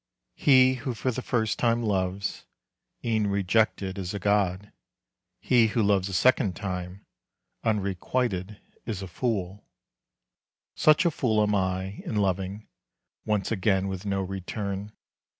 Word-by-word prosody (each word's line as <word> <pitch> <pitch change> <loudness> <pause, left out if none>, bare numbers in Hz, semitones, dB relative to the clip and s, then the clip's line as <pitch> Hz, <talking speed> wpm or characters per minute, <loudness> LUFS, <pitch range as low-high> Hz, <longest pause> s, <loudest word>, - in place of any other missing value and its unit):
He 130 -2 +5
who 130 -4 -3
for 130 +4 -1
the 130 - -4
first 110 -4 -1
time 115 0 +2
loves, 95 -2 -2 0.6
E'en 110 -3 +1
rejected, 100 0 +1
is 95 +1 -4
a - - -3
god. 100 0 0 0.7
He 120 -3 +4
who 110 +1 0
loves 100 -2 +2
a - - -6
second 105 -2 +3
time, 90 0 -5 0.6
Unrequited, 100 0 -1 0.3
is 105 -4 -3
a - - -5
fool. 100 -1 -3 1.1
Such 155 +3 +4
a 170 - +4
fool 110 -7 +1
am 105 0 +1
I, 95 0 -1
in - - -4
loving 100 +1 -1 0.6
Once 105 -2 0
again 95 -2 +1
with 95 -1 -4
no 100 -1 0
return. 100 +2 -4
100 Hz, 135 wpm, -27 LUFS, 95-110 Hz, 1.1 s, He